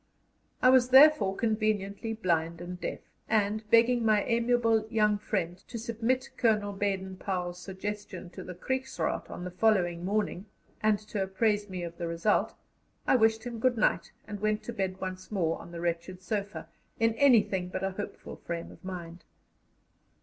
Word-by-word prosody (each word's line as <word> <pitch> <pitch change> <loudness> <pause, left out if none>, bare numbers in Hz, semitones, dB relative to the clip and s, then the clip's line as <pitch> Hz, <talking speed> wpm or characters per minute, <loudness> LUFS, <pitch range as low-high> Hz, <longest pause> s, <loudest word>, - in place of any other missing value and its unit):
I 255 - +8
was 255 -1 +5
therefore 265 -7 +7
conveniently 215 -1 -1
blind 170 -5 0
and 180 +1 -7
deaf, - - -4 0.3
and, 215 0 +1
begging 235 +1 +5
my 215 -2 +3
amiable 230 -2 +2
young 210 -2 +2
friend 185 -5 -2
to 240 - -6
submit 235 +3 -1
Colonel 210 -4 +2
Baden 195 -1 -2
Powell's 180 -2 -3
suggestion 190 -1 -6
to - - -8
the 180 - -8
Kriegsraad 260 +8 -2
on - - -7
the 180 - -5
following 180 -4 +2
morning, 205 0 -1 0.3
and 215 -1 +3
to 205 - -2
apprise 205 +2 0
me 185 -2 -5
of 170 0 -7
the 170 - -2
result, 170 +5 +1 0.5
I - - +4
wished 225 -2 +3
him 240 -2 -5
good 245 +1 +2
night, 215 - +1 0.2
and 210 -1 -6
went 215 +1 0
to 235 - -6
bed 190 -3 -2
once 185 +1 -6
more 170 -6 0
on 170 - -12
the 170 -1 -6
wretched 175 +2 -3
sofa, 200 -6 -3 0.3
in 225 0 +3
anything 225 -8 +4
but 185 +1 -4
a 195 - 0
hopeful 205 +2 -7
frame 170 -1 -5
of 165 - -16
mind. 175 -2 -7
205 Hz, 165 wpm, -29 LUFS, 180-225 Hz, 0.5 s, I